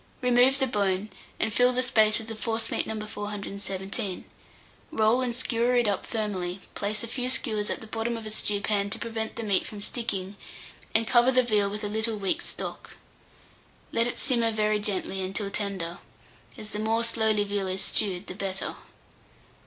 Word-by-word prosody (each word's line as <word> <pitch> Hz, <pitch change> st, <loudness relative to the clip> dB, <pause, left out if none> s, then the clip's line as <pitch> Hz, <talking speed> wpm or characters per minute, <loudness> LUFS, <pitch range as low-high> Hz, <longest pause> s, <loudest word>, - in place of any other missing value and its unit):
Remove 250 Hz, +2 st, +5 dB
the 270 Hz, -, +2 dB
bone, 200 Hz, -3 st, 0 dB, 0.3 s
and 220 Hz, -1 st, +1 dB
fill 245 Hz, +2 st, +5 dB
the 255 Hz, +1 st, +1 dB
space 220 Hz, -4 st, +4 dB
with 225 Hz, 0 st, -7 dB
a -, -, -4 dB
forcemeat 225 Hz, +1 st, -1 dB
No. 215 Hz, -1 st, -3 dB
417. 200 Hz, -1 st, -4 dB, 0.7 s
Roll 220 Hz, +3 st, +3 dB
and 245 Hz, -2 st, -1 dB
skewer 245 Hz, 0 st, +1 dB
it 240 Hz, -2 st, +4 dB
up 205 Hz, -, 0 dB
firmly; 195 Hz, -5 st, -2 dB
place 205 Hz, +1 st, 0 dB
a -, -, -4 dB
few 250 Hz, +2 st, -2 dB
skewers 215 Hz, -5 st, +1 dB
at -, -, -2 dB
the -, -, -8 dB
bottom 225 Hz, +2 st, -2 dB
of 225 Hz, -, -8 dB
a 215 Hz, -, -5 dB
stewpan 205 Hz, -1 st, 0 dB
to -, -, -2 dB
prevent 225 Hz, -1 st, -4 dB
the 230 Hz, -, -4 dB
meat 200 Hz, -3 st, +2 dB
from 210 Hz, -, -7 dB
sticking, 200 Hz, -3 st, -3 dB, 0.6 s
and 225 Hz, +1 st, +5 dB
cover 240 Hz, +2 st, +5 dB
the 255 Hz, 0 st, +5 dB
veal 210 Hz, -4 st, +2 dB
with 210 Hz, +1 st, -5 dB
a -, -, 0 dB
little 220 Hz, +1 st, +1 dB
weak 195 Hz, -2 st, 0 dB
stock. -, -, -6 dB, 0.9 s
Let 230 Hz, +1 st, +2 dB
it 240 Hz, -, -1 dB
simmer 235 Hz, -4 st, +2 dB
very 215 Hz, -1 st, +2 dB
gently 195 Hz, -2 st, -1 dB
until 195 Hz, +2 st, -2 dB
tender, 195 Hz, -4 st, -2 dB, 0.6 s
as 215 Hz, 0 st, -7 dB
the 210 Hz, -, -3 dB
more 225 Hz, +2 st, +1 dB
slowly 220 Hz, -2 st, +2 dB
veal 200 Hz, -1 st, -1 dB
is 185 Hz, +1 st, 0 dB
stewed, 190 Hz, -2 st, 0 dB
the -, -, -6 dB
better. 195 Hz, -1 st, -3 dB
215 Hz, 180 wpm, -28 LUFS, 200-230 Hz, 0.9 s, Remove